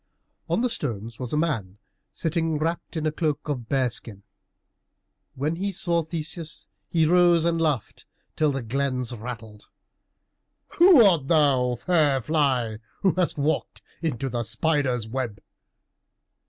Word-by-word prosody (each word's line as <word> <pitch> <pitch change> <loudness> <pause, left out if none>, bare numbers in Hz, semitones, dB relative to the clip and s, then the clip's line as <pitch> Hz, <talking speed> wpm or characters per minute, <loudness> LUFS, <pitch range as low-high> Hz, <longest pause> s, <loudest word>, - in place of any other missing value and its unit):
On - - +1
the 250 - +2
stones 115 - -3
a 150 - 0
man 150 - 0 0.4
was - - -15
sitting 165 -1 0
wrapped 165 +2 -3
in 155 - -2
a 155 - +1
cloak 155 -2 -2
of 125 -6 -4
bear 130 -3 +1
skin. 100 -3 -9 1.1
When 150 +5 -2
he 200 +2 -2
saw 170 -2 +1
Theseus, 160 0 -5 0.2
he 165 -2 +2
rose, 175 0 +4
and 165 -1 +1
laughed 150 -9 -1 0.3
till 155 -2 +2
the 135 -2 -3
glens 125 0 -2
rattled. 110 -2 -8 1.0
"Who 345 -7 +7
art 165 -9 +3
thou, 135 -6 +3
fair 150 -1 +2
fly, 130 -6 0 0.2
who 190 - +3
hast 180 -3 0
walked 150 +2 -1 0.2
into 135 -6 -2
the 120 -2 -2
spider's 130 -4 0
web?" 115 -3 -4
150 Hz, 140 wpm, -25 LUFS, 125-165 Hz, 1.1 s, Who